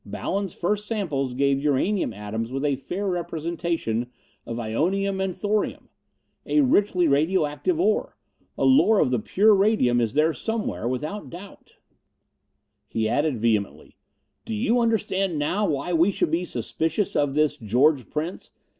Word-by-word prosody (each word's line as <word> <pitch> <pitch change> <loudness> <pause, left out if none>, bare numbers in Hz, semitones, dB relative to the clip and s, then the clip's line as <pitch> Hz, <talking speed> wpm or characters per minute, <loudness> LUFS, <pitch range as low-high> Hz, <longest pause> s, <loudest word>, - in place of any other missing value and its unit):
Ballon's 195 -3 -3
first 210 +4 -1
samples 145 - -2
gave 140 0 +2
uranium 150 - +1
atoms 110 +3 -5
with 135 +2 -2
a 140 -2 +2
fair 180 +9 -4
representation 165 - -2 0.4
of 115 - -4
ionium 190 - -1
and 185 -2 -3
thorium. 205 +2 -2 0.6
A 300 - +3
richly 200 - +3
radio 155 +5 +2
active 315 - -2
ore. 435 +5 0 0.4
A - - +1
lode 260 -6 +5
of 125 - +2
the 125 - +1
pure 210 - +3
radium 195 - +3
is 115 +2 -1
there 155 +2 +3
somewhere, 220 - -3
without 150 +11 -4
doubt." 185 +4 -12 1.1
He 110 -1 -1
added 145 +2 0
vehemently, 110 -3 -1 0.5
"Do 225 - -4
you 240 +2 +1
understand 195 -6 0
now 185 +8 0
why 155 +4 -2
we 170 +3 +4
should 165 - -1
be 170 +2 0
suspicious 165 +3 -2
of 145 -1 +1
this 150 -1 +2
George 130 +3 +2
Prince? 160 +4 -4
165 Hz, 145 wpm, -24 LUFS, 135-200 Hz, 1.1 s, lode